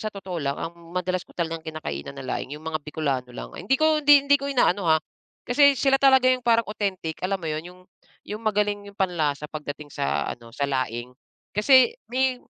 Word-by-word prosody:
sa 215 - -2
totoo 190 -5 -6
lang, 140 0 -1
ang 165 - -5 0.2
madalas 180 0 0
ko - - -20
talagang 165 -1 -2
kinakainan 140 - -6
na 135 - -7
laing 135 +3 -4
yung 155 - -14
mga 160 -1 -2
Bikolano 140 -4 -2
lang. - - -8
Hindi 235 +9 +1
ko, 310 0 +3
hindi 285 -1 +6
hindi 285 0 +5
ko 280 - -3
inaano 200 -9 +2
ha, 160 - +6 0.5
kasi 280 +2 +5
sila 270 0 +3
talaga 265 -2 +6
yung 255 - -1
parang 230 -1 +4
authentic, 195 -6 -3
alam 195 +1 +1
mo - - -9
yun? 155 -1 -2
Yung 180 0 -15 0.4
yung 210 +2 -6
magaling 205 -1 0
yung 200 - -14
panlasa 155 -6 0
pagdating 150 -1 -7
sa 70 +1 -1
ano, 120 -1 -13
sa 140 - 0
laing 125 -3 -2 0.4
kasi 260 - +6 0.2
may 260 +1 +1
180 Hz, 200 wpm, -25 LUFS, 150-245 Hz, 0.5 s, hindi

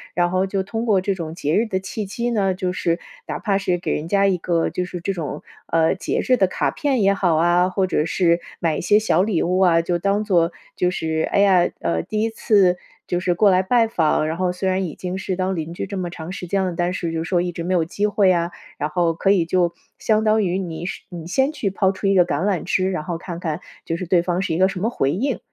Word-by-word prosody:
然 175 0 +2
后 185 +1 +1
就 195 0 -1
通 225 +4 -4
过 205 -4 +4
这 195 +1 0
种 165 -3 -6
节 155 -3 -1
日 225 +2 +2
的 190 -3 -1
契 190 +3 -5
机 235 +4 -2
呢， 195 -4 +1
就 185 -1 -2
是 170 -1 0 0.3
哪 - - -3
怕 200 -3 0
是 180 -2 0
给 175 - -3
人 150 - -3
家 200 +2 +3
一 195 -2 +2
个 170 -1 0
就 180 - -2
是 180 0 -6
这 195 +3 -1
种， 155 -4 -5 0.2
呃， 165 0 +2
节 190 - -2
日 255 - +5
的 195 -6 +3
卡 - - -1
片 270 -7 0
也 195 0 +4
好 180 -4 +1
啊， 175 +3 +3
或 190 +1 0
者 165 -3 0
是 170 0 +2 0.2
买 165 -2 0
一 - - -3
些 205 +4 +4
小 215 -5 +2
礼 195 -4 +1
物 180 +2 +1
啊， 170 -3 +4
就 175 0 -1
当 200 +3 +1
做 175 -5 +2 0.2
就 180 - +1
是， 160 -3 -1
哎 - - +1
呀， 190 -3 +4
呃， 85 -1 0
第 215 - -2
一 225 - 0
次 200 -5 +3 0.3
就 175 - -1
是 180 -1 0
过 200 +2 +5
来 185 0 +4
拜 230 +4 +3
访， 160 -7 +1
然 160 - -2
后 180 +1 0
虽 180 +2 -3
然 190 +1 +1
已 160 - -6
经 180 0 -5
是 190 -1 -2
当 190 +1 -1
邻 165 0 -4
居 - - -3
这 200 +1 -6
么 180 -2 -3
长 165 0 -7
时 185 -1 -6
间 195 +2 0
了， 180 - -2
但 175 +1 0
是 175 -2 -3
就 165 0 -2
是 - - -7
说 180 - +2
一 175 0 -2
直 170 0 -6
没 185 +2 0
有 165 -2 +2
机 200 +5 -1
会 205 -1 +2
呀。 170 -1 +1 0.3
然 150 - -1
后 165 +1 +1
可 180 +4 0
以 185 -4 +3
就 175 0 +1 0.2
相 220 -1 +1
当 215 0 +3
于 180 -1 0
你 175 -2 -5 0.2
你 170 -4 -8
先 265 - +1
去 205 - -1
抛 190 0 +1
出 195 - -3
一 195 - +3
个 180 -2 +5
橄 160 -1 -1
榄 195 -5 0
枝， 185 +1 0
然 180 -5 -3
后 175 -2 -3
看 170 0 -7
看 165 -1 -3 0.2
就 165 - -2
是 185 - -4
对 175 0 +3
方 175 +1 -1
是 180 - -1
一 - - 0
个 190 +1 +4
什 190 -2 -5
么 220 - +1
回 135 - 0
应， 255 - -1
185 Hz, 295 characters per minute, -21 LUFS, 170-195 Hz, 0.3 s, 日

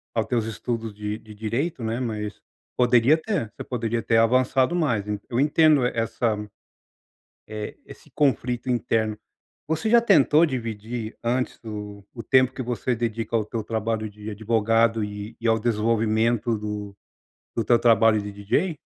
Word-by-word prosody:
aos 110 - +1
teus 120 -3 0
estudos 115 0 -4
de 105 +1 -4
de 110 -2 -13
direito, 115 +6 -2
né, 115 +2 -2
mas 105 -4 -4 0.3
poderia 125 +3 +5
ter, 160 - -3
você - - -7
poderia 115 -2 -2
ter 115 0 +2
avançado 130 +6 +3
mais, 120 - 0 0.2
eu 120 +1 -1
entendo 150 -2 +4
essa, 115 -1 0 1.1
eh, 105 -1 -6
esse - - -14
conflito 125 -3 0
interno, 110 -3 0 0.5
você 160 +7 -1
já 235 0 +7
tentou 170 - +5
dividir 115 -4 -5
antes 125 +2 -1
o 105 -2 -7
o 115 - -7
tempo 130 +1 +3
que 130 - -5
você 125 +1 -1
dedica 115 0 -2
ao 110 - +2
teu 110 +1 -4
trabalho 110 0 -2
de 105 +1 -9
advogado 115 +1 +1
e 105 +1 -6
e 115 - -1
ao 115 0 +4
desenvolvimento 115 +1 +1
do 105 -1 -5 0.6
do 115 - -1
teu 120 +1 +4
trabalho 115 -2 +4
de 100 0 -6
DJ? 140 - -1
115 Hz, 155 wpm, -24 LUFS, 110-125 Hz, 1.1 s, já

